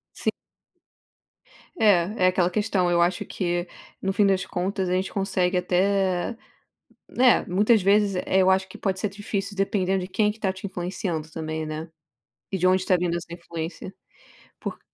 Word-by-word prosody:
Sim. - - 0 1.5
É, 200 -2 +3
é - - +7
aquela 180 -1 +2
questão. 195 -2 +1
Eu 170 0 +3
acho 175 +1 +1
que 175 -1 -2 0.3
no 195 0 -1
fim 200 +1 +3
das 195 -1 +2
contas, 190 +1 -2
a - - -1
gente 185 +1 -1
consegue 185 -2 0
até, 185 +3 +1 0.7
né. 250 -1 +4
Muitas 210 +3 +3
vezes 200 +1 +3
é, 190 - +3
eu 185 - +4
acho 190 0 +2
que 185 - -11
pode 190 -1 -1
ser 210 - -1
difícil, 200 0 -4
dependendo 195 -1 0
de 180 - -5
quem 210 +2 +1
que 220 - -14
tá 195 -3 0
te 190 +1 -9
influenciando 175 -4 -4
também, 160 -1 -4
né. 155 +1 -5 0.6
E 195 - 0
de 185 - 0
onde 185 0 +4
está 185 0 +2
vindo 175 -1 -1
essa 170 0 -8
influência 170 +2 -6 0.7
por - - -5
185 Hz, 175 wpm, -25 LUFS, 175-200 Hz, 1.5 s, é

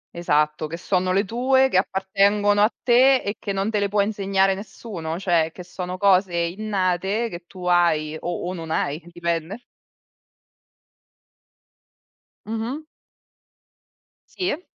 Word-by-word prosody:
Esatto, 150 -2 +1
che 165 +2 -6
sono 185 +1 0
le 195 +3 +2
tue, 260 +5 +2
che 185 - +2
appartengono 200 +2 +2
a 215 +3 +4
te, 255 +2 +5
e 205 +2 -3
che 200 - -4
non 195 +3 -1
te 210 - 0
le 200 - +1
può 205 0 +2
insegnare 195 -2 +1
nessuno. 190 -5 -6
Cioè 170 -4 +1
che 180 - -10
sono 180 +1 -6
cose 190 -2 +3
innate 190 +3 -1
che 175 -3 -9
tu 180 0 -10
hai 165 -3 +2
o 175 0 -4
o 180 - -3
non 165 -3 -7
hai, 155 0 -1
dipende. 170 +5 -3 2.8
Mh-mh. 225 +7 -4 1.5
Sì. 360 -2 -2
190 Hz, 130 wpm, -23 LUFS, 175-210 Hz, 2.8 s, te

